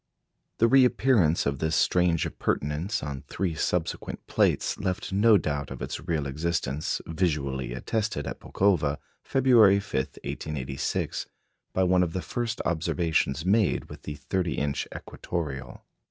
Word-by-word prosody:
The 115 Hz, -, +4 dB
reappearance 125 Hz, -, +4 dB
of 70 Hz, -1 st, -1 dB
this 80 Hz, 0 st, 0 dB
strange 90 Hz, -1 st, +3 dB
appurtenance 80 Hz, +10 st, -2 dB
on 70 Hz, -2 st, -4 dB
three 95 Hz, -4 st, -2 dB
subsequent 80 Hz, +2 st, -2 dB
plates -, -, +1 dB
left 95 Hz, -1 st, -2 dB
no 105 Hz, +2 st, +6 dB
doubt 75 Hz, -5 st, -2 dB
of -, -, -7 dB
its -, -, -4 dB
real 80 Hz, -5 st, 0 dB
existence, 75 Hz, 0 st, -2 dB
visually 70 Hz, -7 st, -1 dB
attested 105 Hz, -, -2 dB
at -, -, -5 dB
Pulkowa, 80 Hz, -8 st, +1 dB, 0.2 s
February 115 Hz, -7 st, +5 dB
5, 100 Hz, -, -10 dB, 0.3 s
1886, 70 Hz, -3 st, -3 dB, 0.4 s
by 95 Hz, -, +1 dB
one 90 Hz, 0 st, +4 dB
of 85 Hz, -2 st, 0 dB
the 95 Hz, -, -3 dB
first 120 Hz, -2 st, -3 dB
observations 80 Hz, -3 st, 0 dB
made 105 Hz, +1 st, +2 dB
with -, -, -10 dB
the 75 Hz, -, -6 dB
30 85 Hz, +5 st, -2 dB
inch 70 Hz, -1 st, -1 dB
equatoreal. 70 Hz, -7 st, -5 dB
85 Hz, 135 wpm, -27 LUFS, 75-100 Hz, 0.4 s, no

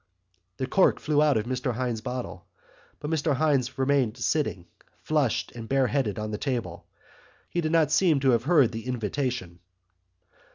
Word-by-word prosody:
Pok! 90 Hz, 0 st, -46 dB
The 130 Hz, -, -2 dB
cork 190 Hz, +8 st, +3 dB
flew 150 Hz, -1 st, +1 dB
out 150 Hz, -4 st, +4 dB
of 110 Hz, -, -1 dB
Mr 125 Hz, -1 st, -2 dB
Hynes' 120 Hz, -2 st, -2 dB
bottle, 120 Hz, -7 st, -6 dB, 0.5 s
but 150 Hz, +1 st, -5 dB
Mr 155 Hz, -2 st, +1 dB
Hynes 135 Hz, -4 st, +1 dB
remained 130 Hz, -4 st, +1 dB
sitting 120 Hz, -, -1 dB, 0.4 s
flushed 150 Hz, -7 st, 0 dB
and 115 Hz, -2 st, -9 dB
bareheaded 135 Hz, -5 st, +1 dB
on 105 Hz, 0 st, -4 dB
the 105 Hz, -, -4 dB
table. 125 Hz, -5 st, -4 dB, 0.6 s
He 175 Hz, -, 0 dB
did 155 Hz, -1 st, -1 dB
not 160 Hz, -3 st, +3 dB
seem 160 Hz, -3 st, +3 dB
to 135 Hz, -1 st, +4 dB
have 120 Hz, 0 st, +1 dB
heard 145 Hz, -8 st, +4 dB
the 115 Hz, +1 st, -7 dB
invitation. 125 Hz, -6 st, -3 dB
130 Hz, 165 wpm, -26 LUFS, 110-145 Hz, 0.6 s, out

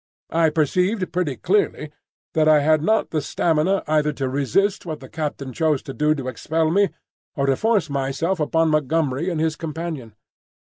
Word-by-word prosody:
I 165 Hz, 0 st, +3 dB
perceived 180 Hz, +6 st, 0 dB
pretty 175 Hz, -7 st, -1 dB
clearly 415 Hz, -, 0 dB, 0.4 s
that 155 Hz, -2 st, +3 dB
I 155 Hz, -1 st, +6 dB
had 155 Hz, +1 st, +3 dB
not 220 Hz, +7 st, +1 dB
the 155 Hz, -, 0 dB
stamina 165 Hz, +6 st, +1 dB
either 150 Hz, 0 st, +2 dB
to 135 Hz, -2 st, -2 dB
resist 145 Hz, -, 0 dB
what 160 Hz, -4 st, -5 dB
the 130 Hz, -, -11 dB
captain 145 Hz, -3 st, -4 dB
chose 155 Hz, -2 st, +1 dB
to 135 Hz, -, -7 dB
do 150 Hz, +2 st, +2 dB
to 135 Hz, -3 st, -5 dB
expel 160 Hz, +4 st, -1 dB
me, 200 Hz, +2 st, +3 dB, 0.5 s
or 140 Hz, -, 0 dB
to 135 Hz, -1 st, +3 dB
force 215 Hz, -, +1 dB
myself 140 Hz, +6 st, -1 dB
upon 160 Hz, +2 st, +2 dB
Montgomery 155 Hz, +1 st, 0 dB
and 170 Hz, -3 st, -2 dB
his 160 Hz, -1 st, 0 dB
companion. 155 Hz, -8 st, -6 dB
155 Hz, 175 wpm, -22 LUFS, 145-170 Hz, 0.5 s, I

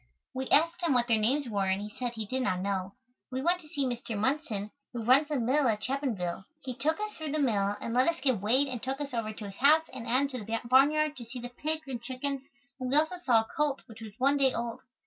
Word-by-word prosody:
We 260 Hz, 0 st, -4 dB
asked 335 Hz, +4 st, +3 dB
him 335 Hz, -5 st, +2 dB
what 240 Hz, -1 st, +2 dB
their 225 Hz, -3 st, +3 dB
names 260 Hz, +6 st, +1 dB
were 200 Hz, -4 st, 0 dB
and 190 Hz, +1 st, +1 dB
he 210 Hz, +1 st, -6 dB
said 245 Hz, -1 st, -3 dB
he 220 Hz, -2 st, -4 dB
did 260 Hz, +5 st, -2 dB
not 185 Hz, -7 st, 0 dB
know. 195 Hz, 0 st, -2 dB, 0.4 s
We 260 Hz, +1 st, -2 dB
went 355 Hz, +2 st, +2 dB
to 310 Hz, -, -15 dB
see 285 Hz, -2 st, -1 dB
Mr. 240 Hz, -3 st, -3 dB
Munson, 215 Hz, -4 st, -1 dB, 0.2 s
who 235 Hz, -2 st, -4 dB
runs 260 Hz, +6 st, +5 dB
the 295 Hz, -3 st, -1 dB
mill 260 Hz, +4 st, +2 dB
at 215 Hz, -2 st, 0 dB
Chapinville. 225 Hz, -10 st, -2 dB, 0.2 s
He 255 Hz, -, -4 dB
took 310 Hz, -, 0 dB
us 425 Hz, 0 st, -3 dB
through 310 Hz, -2 st, -4 dB
the -, -, +1 dB
mill 205 Hz, -8 st, +1 dB
and 230 Hz, -, -4 dB
let 255 Hz, +2 st, +4 dB
us 335 Hz, 0 st, +1 dB
get 255 Hz, -8 st, +1 dB
weighed 255 Hz, +7 st, +3 dB
and 250 Hz, -4 st, -5 dB
took 265 Hz, +2 st, -3 dB
us 285 Hz, -2 st, -5 dB
over 225 Hz, -2 st, -2 dB
to 215 Hz, 0 st, -8 dB
his 195 Hz, -1 st, -9 dB
house 310 Hz, +4 st, +5 dB
and 230 Hz, -2 st, -7 dB
out 250 Hz, +3 st, +3 dB
into 265 Hz, -5 st, -3 dB
the 225 Hz, +2 st, -2 dB
barn 260 Hz, +4 st, +6 dB
yard 305 Hz, 0 st, 0 dB
to 240 Hz, -, -8 dB
see 235 Hz, +3 st, -9 dB
the 245 Hz, 0 st, -6 dB
pigs 310 Hz, +4 st, -2 dB
and 250 Hz, -3 st, -4 dB
chickens 260 Hz, +3 st, -3 dB, 0.4 s
and 255 Hz, -1 st, -3 dB
we 270 Hz, -, +1 dB
also 315 Hz, +4 st, +2 dB
saw 235 Hz, -6 st, +5 dB
a 220 Hz, -, -9 dB
colt 295 Hz, -2 st, 0 dB
which 225 Hz, -1 st, -13 dB
was 215 Hz, -2 st, -8 dB
one 275 Hz, +2 st, +3 dB
day 270 Hz, -2 st, +4 dB
old. 235 Hz, 0 st, -3 dB
255 Hz, 265 wpm, -30 LUFS, 225-285 Hz, 0.4 s, barn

